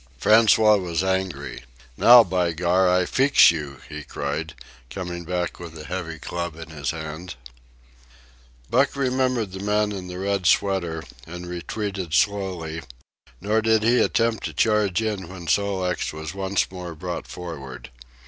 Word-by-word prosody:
François 110 - +5
was 85 0 -1
angry. 95 -9 -2 0.3
"Now, 120 - +8
by 90 -3 0
Gar, 90 +3 +2
I 90 0 +3
feex 135 -1 +5
you!" 75 -4 -6
he 75 0 -7
cried, 75 +3 -4 0.3
coming 85 0 -6
back 90 0 -3
with 85 -2 -9
a 75 - -9
heavy 85 -1 -5
club 85 +2 -5
in 80 0 -10
his 70 -3 -4
hand. 80 +1 -6 1.3
Buck 135 +3 +2
remembered 130 -5 0
the 95 - -7
man 105 +1 +1
in 95 -3 -6
the 90 0 -7
red 100 -1 -1
sweater, 85 -3 +1 0.2
and 90 +2 -7
retreated 90 0 -4
slowly; 90 -4 0 0.6
nor 110 +2 +1
did 110 -1 +2
he 120 +2 +4
attempt 115 -1 +1
to - - -5
charge 105 -2 +2
in 105 -5 -3
when 90 -1 -9
Sol 100 +1 +1
leks 90 -2 -1
was 80 +2 -7
once 95 0 -1
more 90 -3 -7
brought 90 +3 -5
forward. 70 -8 -8
90 Hz, 150 wpm, -23 LUFS, 80-100 Hz, 1.3 s, Now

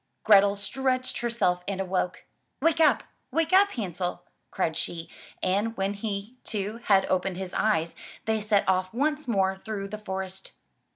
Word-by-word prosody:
Grethel 200 -1 +6
stretched 255 +5 -1
her 240 - -1
self 180 -6 +1
and 195 -1 -2
awoke. 185 -1 -1 0.3
"Wake 330 -1 +2
up! 315 - +5 0.3
Wake 330 +2 +1
up. 400 +2 +7
Hansel," 180 -5 -3 0.3
cried 160 - -1
she, 165 -1 -3 0.3
and 210 +5 +1
when 195 +1 0
he, 205 +3 -5
too, 210 +1 -3
had 195 -2 +5
opened 185 0 0
his 190 -1 -5
eyes, 170 -7 +1 0.3
they 220 -1 +1
set 210 -1 +2
off 185 +2 +1
once 300 +2 0
more 190 -4 +2
through 200 -2 -4
the 215 +1 -6
forest. 190 -2 -5
200 Hz, 160 wpm, -27 LUFS, 190-230 Hz, 0.3 s, up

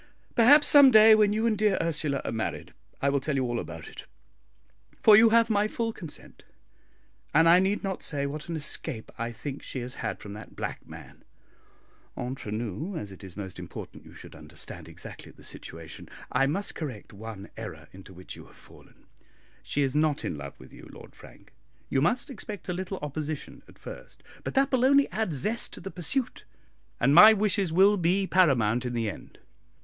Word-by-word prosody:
Perhaps 290 +5 +7
some 285 -2 +9
day 220 -2 +8
when 210 -1 +4
you 220 +2 0
and 225 -2 +2
dear 210 -2 +2
Ursula 150 -4 -1
are - - -2
married, 110 -1 -4 0.3
I 140 - +3
will 140 0 +1
tell 140 +2 -3
you 135 - +1
all 120 -1 -2
about 80 0 -8
it; - - -11 1.0
for 215 - +9
you 225 +1 +7
have 230 0 +4
my 210 -1 +2
full 225 +1 -3
consent; 165 -8 -11 0.9
and 165 +2 +6
I 170 +2 +7
need 195 +2 0
not 195 -2 -3
say 140 -2 -2
what 150 +3 -6
an 170 - -2
escape 140 -6 -4
I 115 0 -3
think 140 +4 -7
she 130 - -6
has 125 +1 -6
had - - -3
from 100 - -9
that 105 - -11
black - - -6
man. - - -13 0.9
Entre 125 -3 -5
nous, 115 - -4
as 105 -7 -6
it 95 - -13
is 95 -1 -10
most 95 -3 -7
important - - -9
you - - -15
should - - -12
understand 80 0 -9
exactly - - -11
the - - -19
situation, - - -9 0.2
I 135 +2 +2
must 195 +8 -2
correct 130 -10 -7
one 105 -1 -9
error - - -8
into 95 0 -13
which 90 0 -10
you - - -13
have - - -20
fallen; - - -20 0.6
she 145 - -1
is 135 0 -1
not 150 -1 +1
in - - -3
love 70 -1 -9
with - - -15
you, - - -13
Lord - - -14
Frank; - - -17 0.4
you 135 - +1
must 240 - 0
expect 210 -4 -8
a 180 - -2
little 185 +2 -4
opposition 150 +1 -5
at - - -18
first; - - -11 0.2
but - - -5
that 275 +1 +3
will 255 -2 +2
only 280 +1 +4
add 220 -5 -1
zest 210 - -2
to - - -8
the 195 +2 -7
pursuit, 205 - -2 0.6
and 140 - +3
my 215 +7 +10
wishes 200 -4 +1
will 195 +5 +5
be 185 +3 +1
paramount 125 - +3
in 125 -1 -4
the 115 -2 -1
end. 105 - -8
160 Hz, 195 wpm, -27 LUFS, -, 1.0 s, my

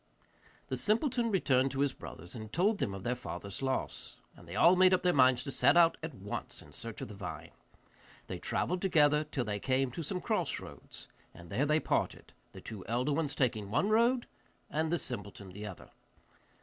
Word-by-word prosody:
The - - -1
simpleton 235 +2 +1
returned 135 - +3
to 135 - -1
his 140 -1 +2
brothers 90 +3 -9
and 110 -2 -7
told 200 +5 +2
them 100 - -1
of 95 - -8
their 120 +2 0
father's 100 -3 -6
loss, 130 -1 -2 0.2
and 85 - -16
they 85 - -7
all 170 - +6
made 185 0 +6
up 185 - -3
their 180 -1 +4
minds 130 -2 +5
to 140 - -4
set 145 +4 +4
out 170 -1 +6
at 160 -4 -6
once 100 +2 -5
in - - -13
search 115 -2 -6
of - - -4
the 105 - -9
vine. 100 -2 -7 0.7
They - - -6
travelled 180 0 -1
together 150 -5 +4
till 140 -4 -3
they 105 -1 -2
came 130 +2 +1
to 165 - -5
some 180 +4 -2
cross - - -1
roads, - - -11 0.3
and 85 -1 -12
there 130 +9 +1
they 155 +1 +3
parted, - - -2 0.2
the - - -11
two 105 -4 -8
elder 125 +5 0
ones 145 -2 0
taking 110 -6 0
one 185 - +1
road, 235 +3 +3 0.5
and 160 +1 0
the 175 - +2
simpleton 100 - -5
the 105 +3 -7
other. 95 - -10
135 Hz, 200 wpm, -32 LUFS, 105-175 Hz, 0.7 s, all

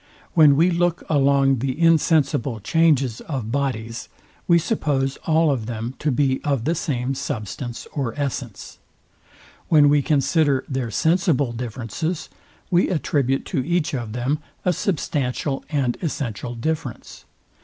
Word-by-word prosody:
When 150 -4 +6
we 170 +5 +4
look 175 0 0
along 135 -2 +3
the 135 +3 -2
insensible 160 -7 +2
changes 135 -1 +2
of 130 -8 -4
bodies, 115 -4 -3 0.4
we 170 - +6
suppose 145 - 0
all 160 -1 +4
of 120 -6 -2
them 115 +1 -4
to 150 - 0
be 130 0 +1
of 140 -5 0
the 165 - +2
same 135 -5 -2
substance 120 -3 -5
or 135 -2 -3
essence. 130 -6 -5 0.9
When 150 -3 +6
we 145 0 +4
consider 145 -1 +2
their 130 -3 -2
sensible 160 - +1
differences, 125 - -4 0.4
we 175 0 +3
attribute 140 -6 0
to 135 -6 +1
each 170 +1 0
of 120 -5 -4
them 130 +5 -1 0.3
a 180 - +3
substantial 145 -6 -2
and 135 -5 0
essential 125 - -3
difference. 145 0 -4
140 Hz, 135 wpm, -22 LUFS, 125-160 Hz, 0.9 s, When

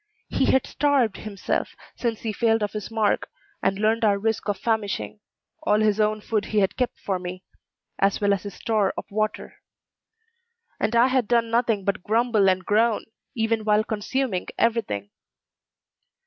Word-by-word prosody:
He - - +1
had 265 - +3
starved 275 -8 +1
himself; 205 -3 -3 0.2
since 230 -3 -2
he 220 -2 -2
failed 225 -1 +2
of 205 - -1
his 210 -1 -5
mark, 220 -2 0 0.3
and 195 - +1
learned 220 +2 +1
our 205 -2 +4
risk 220 0 -1
of 200 - 0
famishing, 205 - -2 0.4
all 210 0 +2
his 215 -1 +2
own 215 0 +1
food 215 -1 -1
he 215 - -3
had 195 -2 +1
kept 250 -1 -1
for 190 -2 -2
me, 180 +1 -7 0.6
as 195 0 +2
well 205 -1 +3
as 195 - -1
his 200 -1 -8
store 215 -4 0
of - - -4
water. 215 +1 -2 1.2
And 235 - 0
I 235 +1 +6
had 255 -4 +1
done 230 -1 +2
nothing 230 -4 +1
but 200 -2 0
grumble 220 -1 +3
and 185 -1 0
groan, 220 +1 +2 0.3
even 225 -1 0
while 210 0 +3
consuming 220 -1 -2
every 230 0 +3
thing. 100 - -6
215 Hz, 170 wpm, -24 LUFS, 200-230 Hz, 1.2 s, I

